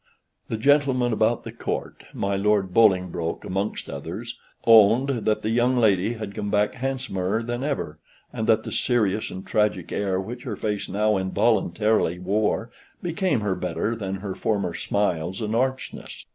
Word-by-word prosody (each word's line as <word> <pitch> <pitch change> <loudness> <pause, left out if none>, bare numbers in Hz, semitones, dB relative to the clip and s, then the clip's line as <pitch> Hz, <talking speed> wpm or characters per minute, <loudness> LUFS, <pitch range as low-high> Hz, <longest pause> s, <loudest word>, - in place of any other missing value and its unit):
The 110 - -3
gentlemen 130 -1 +3
about - - +1
the - - -7
Court, - - -5
my 100 0 -1
Lord 100 -2 +1
Bolingbroke 90 -6 +2
amongst 95 +3 -3
others, 90 +12 -6 0.3
owned 115 +4 +6
that 110 -5 0
the 110 - 0
young 120 +2 +2
lady 105 -2 +3
had 110 -3 -6
come 105 -1 -3
back 105 0 +2
handsomer 125 -6 -2
than 120 +2 -3
ever, 85 - -3 0.3
and 110 - -3
that 110 -1 +4
the - - -6
serious 110 -4 +1
and 95 - -8
tragic 105 -5 0
air 95 -2 0
which 120 +6 -6
her 125 -5 -4
face 105 0 -3
now 105 +1 +2
involuntarily 100 -1 +1
wore 105 +5 0 0.3
became 175 - 0
her 100 -2 0
better 90 +5 -2
than 95 -3 -4
her 95 0 -5
former 100 -4 -1
smiles 95 -3 -1
and 110 0 -2
archness. 130 +2 -3
105 Hz, 160 wpm, -24 LUFS, 95-115 Hz, 0.3 s, owned